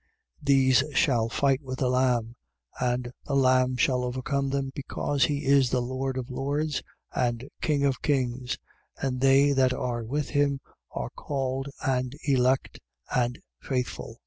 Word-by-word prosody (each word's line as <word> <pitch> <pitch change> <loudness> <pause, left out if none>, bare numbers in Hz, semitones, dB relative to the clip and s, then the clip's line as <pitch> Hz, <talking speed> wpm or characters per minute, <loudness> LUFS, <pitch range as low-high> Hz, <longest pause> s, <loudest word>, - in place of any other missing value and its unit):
17:14. - - -11
These 130 -2 +5
shall 120 -7 +3
fight 135 +3 +2
with 130 -2 -6
the 130 - +1
Lamb. 125 -2 +1 0.4
And 125 -1 -1 0.2
the 140 - 0
Lamb 130 -1 +3
shall 125 0 +2
overcome 135 +2 -1
them 135 -1 -1
because 140 0 0
he 145 0 -2
is 135 -3 +4
Lord 130 +2 -2
of 130 +1 -4
lords 145 +3 -1 0.3
and 120 +1 -1
King 145 -3 +1
of 135 -2 0
kings: 130 -3 0 0.4
and 130 -2 -2
they 135 +1 +5
that 130 -2 +3
are 120 -2 -2
with 140 +5 -2
him 145 -2 +2 0.3
are - - -5
called 135 -1 -3 0.2
and 130 -1 0
elect 130 -1 +2 0.4
and 125 0 +1 0.2
faithful. 125 -3 -3
130 Hz, 145 wpm, -27 LUFS, 125-140 Hz, 0.4 s, These